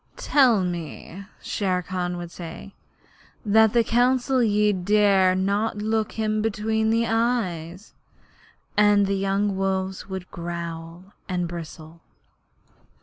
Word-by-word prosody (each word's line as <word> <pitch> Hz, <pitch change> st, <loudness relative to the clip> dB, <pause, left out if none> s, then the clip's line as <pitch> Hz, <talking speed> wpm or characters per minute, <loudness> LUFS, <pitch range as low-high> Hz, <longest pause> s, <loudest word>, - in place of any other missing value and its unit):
'They -, -, -12 dB
tell 245 Hz, -9 st, +4 dB
me,' 175 Hz, +2 st, -6 dB, 0.2 s
Shere 185 Hz, -3 st, -1 dB
Khan 180 Hz, -1 st, -3 dB
would 175 Hz, -1 st, -7 dB
say, 170 Hz, +3 st, -9 dB, 0.7 s
'that 220 Hz, +2 st, +4 dB
at 235 Hz, -1 st, +4 dB
Council 250 Hz, +2 st, +2 dB
ye 210 Hz, -2 st, +2 dB
dare 195 Hz, 0 st, +3 dB
not 200 Hz, +3 st, 0 dB
look 220 Hz, +1 st, -1 dB
him 215 Hz, -1 st, -1 dB
between 220 Hz, +1 st, 0 dB
the 230 Hz, +1 st, +2 dB
eyes'; 215 Hz, -6 st, -2 dB, 0.8 s
and 205 Hz, -1 st, +4 dB
the 195 Hz, -, -1 dB
young 195 Hz, +1 st, 0 dB
wolves 190 Hz, 0 st, -2 dB
would 190 Hz, -1 st, -6 dB
growl 170 Hz, +2 st, -7 dB, 0.2 s
and 180 Hz, -1 st, -1 dB
bristle. 165 Hz, -1 st, -9 dB
195 Hz, 120 wpm, -24 LUFS, 180-220 Hz, 0.8 s, tell